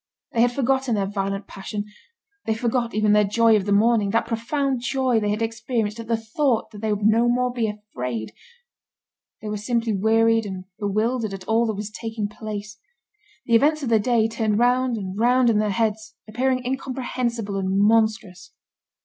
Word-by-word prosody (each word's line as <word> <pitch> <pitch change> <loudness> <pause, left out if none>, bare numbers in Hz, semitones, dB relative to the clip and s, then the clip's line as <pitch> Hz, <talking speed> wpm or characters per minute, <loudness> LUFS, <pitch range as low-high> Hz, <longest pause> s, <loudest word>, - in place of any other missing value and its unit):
They 230 - +1
had 240 0 +4
forgotten 265 -1 0
their 200 -2 0
violent 195 0 -3
passion, 205 +2 -6 0.6
they 220 - 0
forgot 235 0 -1
even 215 -1 +3
their 210 0 +5
joy 225 +2 +4
of 200 -3 0
the 205 - -1
morning, 210 0 +3
that 230 +3 +1
profound 260 +3 -1
joy 255 -1 +1
they 210 -1 -1
had 210 +2 -1
experienced 225 -1 -2
at 230 - -7
the 230 0 +1
thought 225 0 -1
that 210 -2 -10
they 220 -1 -1
would 205 0 -1
no 230 +2 +4
more 250 0 +1
be 235 -3 0
afraid. 125 - -5 1.1
They - - -5
were 210 - -2
simply 230 +1 -1
wearied 225 +2 +3
and 185 -1 -6
bewildered 215 +1 -1
at 185 -1 -11
all 230 +1 +2
that 220 - -2
was 210 +1 -5
taking 225 -2 -4
place. 215 0 -7 0.7
The 235 - -1
events 295 +6 +4
of 255 - -2
the 225 -1 +4
day 225 0 +2
turned 220 -2 -1
round 245 0 +2
and 195 -1 -5
round 245 +1 +4
in 210 - +2
their 210 0 +1
heads, 220 +1 -1
appearing 255 +3 -1
incomprehensible 250 -5 -3
and 190 -1 -1
monstrous. 210 -4 +1
225 Hz, 185 wpm, -23 LUFS, 210-240 Hz, 1.1 s, their